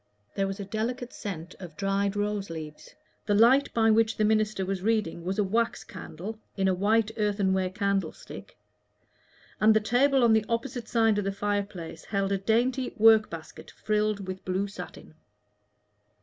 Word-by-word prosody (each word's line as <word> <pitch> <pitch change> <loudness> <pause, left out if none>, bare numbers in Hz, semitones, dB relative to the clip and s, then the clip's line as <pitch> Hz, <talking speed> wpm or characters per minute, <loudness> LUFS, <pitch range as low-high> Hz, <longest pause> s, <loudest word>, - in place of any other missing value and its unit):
There 195 0 0
was 195 +1 -5
a 200 - -4
delicate 235 +5 -3
scent 180 -3 -6
of 175 -5 -10
dried 200 0 0
rose 205 -1 -2
leaves; 155 -2 -9 0.3
the 205 - +2
light 245 +6 +5
by 225 -1 +3
which 225 0 +2
the 215 - +2
minister 215 -2 +1
was 190 -1 -3
reading 205 -6 0
was 190 +2 -3
a 210 - +3
wax 225 +4 0
candle 190 +4 -8 0.2
in 190 -1 +2
a 190 - +3
white 215 +4 +2
earthenware 195 -3 +1
candle 200 0 -1
stick, - - -12 1.0
and 215 +1 +5
the - - +6
table 255 +5 +3
on 230 -2 +5
the 220 -1 +3
opposite 235 0 -3
side 225 -3 +2
of - - -1
the 195 - -1
fireplace 200 -5 -4
held 195 -1 -1
a 195 - +1
dainty 245 +5 0
work 220 -1 +6
basket 165 -1 -10
frilled 210 -1 -1
with 185 0 -6
blue 185 +2 -1
satin. 180 -4 -10
205 Hz, 170 wpm, -27 LUFS, 190-220 Hz, 1.0 s, the